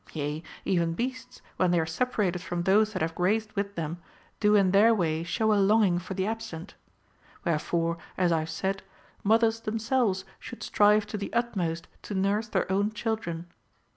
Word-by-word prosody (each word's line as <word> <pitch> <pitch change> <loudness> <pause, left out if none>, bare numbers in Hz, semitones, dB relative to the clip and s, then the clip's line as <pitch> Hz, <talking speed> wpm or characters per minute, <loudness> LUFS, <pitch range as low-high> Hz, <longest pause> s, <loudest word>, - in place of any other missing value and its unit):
Yea, 150 0 -3 0.2
even 170 -3 +1
beasts, 250 +4 -5
when 185 - +3
they 175 -1 +3
are 160 - +1
separated 180 0 -1
from 175 -1 -3
those 210 +4 +4
that 185 -6 -2
have 165 0 -1
grazed 215 +5 0
with 200 -1 -3
them, 165 +1 -4 0.4
do 210 0 +4
in 195 -3 +4
their 220 +4 +6
way 160 -5 0
show 215 +6 +1
a 205 - +3
longing 195 -3 +4
for 185 +2 -6
the 190 0 0
absent. 220 -5 -5 0.7
Wherefore, 170 +1 0 0.2
as 180 -2 +2
I 165 - +3
have 155 +1 -4
said, 190 +4 -2 0.4
mothers 225 +2 +3
themselves 220 -3 0
should 245 - -9
strive 210 0 +4
to 210 0 -5
the 200 - -5
utmost 185 -9 -1
to 205 - -6
nurse 200 +4 +1
their - - 0
own 200 +2 +1
children. 215 -8 -3
195 Hz, 175 wpm, -28 LUFS, 170-220 Hz, 0.7 s, their